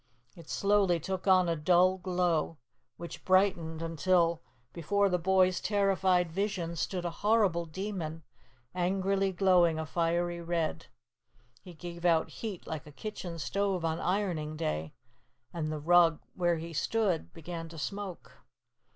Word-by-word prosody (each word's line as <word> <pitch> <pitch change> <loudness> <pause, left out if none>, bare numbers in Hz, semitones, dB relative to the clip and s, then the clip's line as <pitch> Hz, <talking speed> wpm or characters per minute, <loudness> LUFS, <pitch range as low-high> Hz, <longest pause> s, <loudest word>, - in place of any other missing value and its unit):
It 170 -2 -14
slowly 200 -4 +2
took 190 +4 -4
on 185 -2 +5
a 165 - +1
dull 180 +4 +3
glow, 175 -3 0 0.4
which 170 - -8
brightened 175 -4 +2
until 165 0 +2 0.3
before 200 +4 +1
the 180 -1 +1
boys' 185 +1 +3
terrified 190 -4 +2
vision 180 -2 -2
stood 175 +3 -2
a 175 - -1
horrible 205 -6 +2
demon, 165 -3 -5 0.5
angrily 190 +2 0
glowing 180 -3 +3
a 160 - -3
fiery 170 +1 -1
red. 165 -1 -2 0.7
He 180 -2 -12
gave 170 +1 -8
out 165 -2 +2
heat 210 -6 -6
like 155 -2 -6
a - - -11
kitchen 180 0 -6
stove 190 +1 -1
on 160 0 -1
ironing 175 -5 -1
day, 80 - -3 0.6
and 155 -2 -3
the 155 - -3
rug 165 +1 +4
where 175 -2 +1
he 165 +1 -7
stood 195 +1 0
began 165 0 -7
to 165 - -11
smoke. 160 - -6
175 Hz, 140 wpm, -30 LUFS, 165-190 Hz, 0.7 s, on